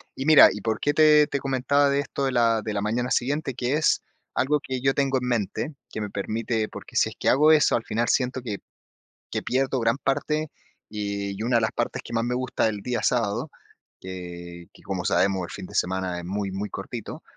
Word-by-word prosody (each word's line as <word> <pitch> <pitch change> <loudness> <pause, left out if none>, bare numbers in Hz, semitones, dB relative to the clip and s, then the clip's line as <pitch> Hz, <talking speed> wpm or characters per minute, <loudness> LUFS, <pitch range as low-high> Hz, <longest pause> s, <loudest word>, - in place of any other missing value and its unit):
Y 135 - -4
mira, 155 -2 +9
y 105 - -6
por 110 -1 -1
qué 145 - +1
te 150 -1 +6
te 140 - -2
comentaba 135 +2 +2
de 140 0 +1
esto 140 0 -2
de 135 - 0
la 115 -2 +3
de 110 - -3
la 100 - -1
mañana 120 +4 -1
siguiente, 135 +2 0
que 125 +2 -1
es 155 - +2 0.3
algo 150 +2 +1
que 130 -2 -5
yo 135 0 +3
tengo 135 -2 +1
en 125 - -3
mente, 120 +6 -1 0.2
que 110 - -4
me 105 - -3
permite 110 +2 -2
porque - - -11
si - - +3
es - - -12
que - - +2
hago 150 +4 +5
eso, 155 -2 +5
al 115 - -1
final 115 +2 -1
siento 130 0 +1
que 105 -5 -4 0.7
que - - -2
pierdo 130 0 0
gran 115 +3 +1
parte 150 +3 -1 0.4
y 100 -1 -3
y, - - -2
una 120 0 +2
de - - +2
las 110 - 0
partes - - -2
que - - -9
más 115 0 +1
me 125 +1 -1
gusta 125 -2 -1
del 105 -2 -1
día 120 -1 -2
sábado, 105 -1 0 0.5
que 85 -2 -8
que - - -18
como - - -4
sabemos, 95 -2 +2
el - - -7
fin 95 - -7
de - - -11
semana 90 -1 -1
es 85 - -8
muy, 100 +1 -3
muy 100 +2 -4
cortito, 110 +3 -7
120 Hz, 230 wpm, -25 LUFS, 100-135 Hz, 0.7 s, mira